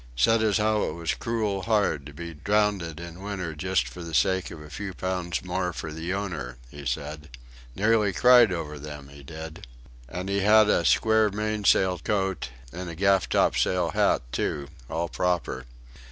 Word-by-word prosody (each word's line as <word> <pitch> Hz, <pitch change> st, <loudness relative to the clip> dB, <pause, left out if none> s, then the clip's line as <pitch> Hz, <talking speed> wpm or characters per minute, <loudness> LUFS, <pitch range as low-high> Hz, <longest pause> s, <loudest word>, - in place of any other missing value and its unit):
Said 115 Hz, -, +4 dB
as 110 Hz, -2 st, +3 dB
how 110 Hz, 0 st, +2 dB
it -, -, -3 dB
was 85 Hz, -2 st, -2 dB
crool 105 Hz, -, -2 dB
hard 95 Hz, -9 st, +1 dB
to -, -, -9 dB
be 85 Hz, +3 st, -7 dB
drownded 95 Hz, -1 st, 0 dB
in 85 Hz, +1 st, -9 dB
winter 95 Hz, -5 st, -4 dB
just 80 Hz, -4 st, 0 dB
for -, -, -9 dB
the 85 Hz, -2 st, -5 dB
sake 95 Hz, +4 st, +2 dB
of -, -, -9 dB
a 75 Hz, -1 st, -12 dB
few 95 Hz, -3 st, -5 dB
pounds 90 Hz, -4 st, -2 dB
more 90 Hz, 0 st, -1 dB
for 80 Hz, 0 st, -6 dB
the 80 Hz, +3 st, -4 dB
owner 85 Hz, -11 st, -4 dB
he 70 Hz, -1 st, -7 dB
said. 75 Hz, +1 st, -4 dB, 0.5 s
Nearly 105 Hz, -1 st, +3 dB
cried 125 Hz, -1 st, +6 dB
over 75 Hz, -4 st, -4 dB
them 75 Hz, -1 st, -9 dB
he 70 Hz, 0 st, -13 dB
did; 80 Hz, 0 st, -9 dB, 0.4 s
and 90 Hz, +2 st, -5 dB
he 100 Hz, 0 st, 0 dB
had 105 Hz, +1 st, +6 dB
a 85 Hz, -, +2 dB
square 110 Hz, +6 st, +4 dB
mainsail 105 Hz, -3 st, +2 dB
coat, 95 Hz, -6 st, -1 dB, 0.2 s
and 90 Hz, 0 st, -5 dB
a 85 Hz, -, -7 dB
gaff 95 Hz, +1 st, +3 dB
topsail 90 Hz, -2 st, +2 dB
hat -, -, +2 dB
too 70 Hz, -1 st, -2 dB, 0.2 s
all 85 Hz, +1 st, -1 dB
proper. 85 Hz, -9 st, -1 dB
90 Hz, 175 wpm, -26 LUFS, 80-100 Hz, 0.5 s, cried